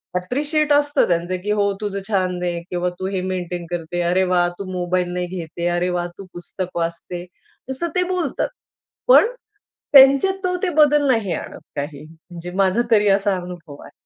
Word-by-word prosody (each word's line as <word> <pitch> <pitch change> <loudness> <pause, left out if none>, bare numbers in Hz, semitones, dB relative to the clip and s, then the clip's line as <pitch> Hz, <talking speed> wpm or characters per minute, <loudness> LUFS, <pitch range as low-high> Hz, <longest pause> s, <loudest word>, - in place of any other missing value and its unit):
Appreciate 290 - 0
असतं 290 0 +3
त्यांचं 175 +1 0
की 210 - -1
हो 205 -1 +2
तुझं 200 -1 -2
छान 185 -4 0
आहे 175 -1 -2
किंवा 180 0 -1
तू 185 - -2
हे 185 - 0
मेंटेन 180 -2 -4
करते. 175 0 -3
अरे 175 +2 +2
वाह! 175 -1 +4
तू 200 - -4
मोबाईल 180 0 -1
नाही 180 0 -2
घेते. 170 +1 -4
अरे 175 +1 0
वाह! 175 -1 -1
तू 195 - -9
पुस्तक 180 +1 -5
वाचते. 170 +1 -4 0.4
तसं 265 +6 -2
ते 360 - +3
बोलतात, 365 -2 -1 0.6
पण - - +8 0.7
त्यांच्यात 275 +7 +7
तो 360 0 +1
ते 380 - +1
बदल 295 -1 +4
नाही 220 -7 +1
आणत - - -7 0.2
काही, 145 0 -5
म्हणजे 165 +2 -11
माझा 195 +5 +2
तरी 210 -2 +4
असा 195 0 +2
अनुभव 175 -5 -9
आहे. - - -13
180 Hz, 175 wpm, -21 LUFS, 175-225 Hz, 0.7 s, पण